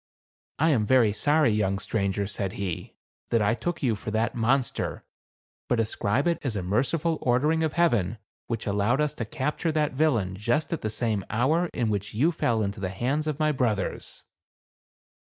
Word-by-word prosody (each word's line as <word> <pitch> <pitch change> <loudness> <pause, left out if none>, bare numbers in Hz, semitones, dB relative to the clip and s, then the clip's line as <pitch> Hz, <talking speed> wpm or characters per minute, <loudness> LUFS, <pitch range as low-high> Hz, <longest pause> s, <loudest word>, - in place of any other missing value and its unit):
"I 160 +3 +3
am 120 -7 +2
very 120 -5 +4
sorry, 145 +4 +3
young 100 -2 +1
stranger," 100 -1 -1
said 100 -1 -3
he, 95 -4 -5 0.2
" - - -55
that 115 - +3
I 105 0 +2
took 175 +6 -3
you 120 -4 +2
for 105 - -6
that 110 +2 0
monster; 125 +2 0 0.6
but 120 - +1
ascribe 110 +3 0
it 170 -1 +1
as 125 -6 -2
a 100 - -2
merci 115 - +1
ful 165 0 -1
ordering 145 +6 +2
of 160 -2 0
Heaven, 120 - +2 0.3
which 115 -2 -3
allowed 105 +6 +1
us 150 -1 +1
to - - -4
capture 155 +3 -2
that 150 -2 +1
villain 120 -11 +1
just 120 - 0
at 165 - -3
the 110 - -2
same 110 -2 -1
hour 155 +10 +1
in 120 -3 -1
which 105 0 -3
you 150 +10 +3
fell 115 -9 0
into 100 0 -3
the 95 -1 -2
hands 130 +10 -1
of 150 -2 -1
my 155 -1 +2
brothers." 115 -8 -2
120 Hz, 190 wpm, -26 LUFS, 105-150 Hz, 0.6 s, very